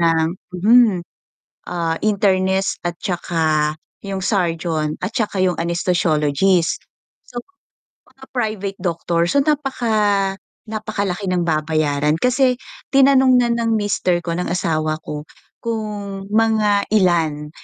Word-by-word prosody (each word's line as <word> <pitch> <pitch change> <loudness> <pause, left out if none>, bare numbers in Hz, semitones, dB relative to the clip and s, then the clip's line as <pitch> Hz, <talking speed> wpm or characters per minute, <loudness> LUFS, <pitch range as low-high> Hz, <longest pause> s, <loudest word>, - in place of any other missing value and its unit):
ng 165 -1 +3 0.3
hmm 220 0 +5 0.7
ah 165 -2 -2
internist 190 -2 +1
at 175 - +1
tsaka 160 -4 0 0.3
yung 195 -1 -3
surgeon 165 -6 0
at 185 - -2
tsaka 210 -5 -1
yung 185 -2 +2
anesthesiologist. 170 0 +1 0.4
So 245 - -6 0.7
mga 265 +1 -19
private 215 -5 -3
doctor, 170 -1 0
so 280 +10 +3
napaka 220 -9 +1 0.3
napakalaki 215 -3 -3
ng 180 - +1
babayaran 155 -2 +1
kasi 255 +1 +3 0.4
tinanong 265 -2 +5
na 240 - +1
ng 235 -1 0
mister 200 -4 0
ko, 170 -1 -3
ng 180 - -2
asawa 155 -3 -1
ko 150 -1 -6 0.3
kung 210 -4 -4
mga 215 -2 +2
ilan 165 -7 +2
190 Hz, 110 wpm, -20 LUFS, 165-215 Hz, 0.7 s, hmm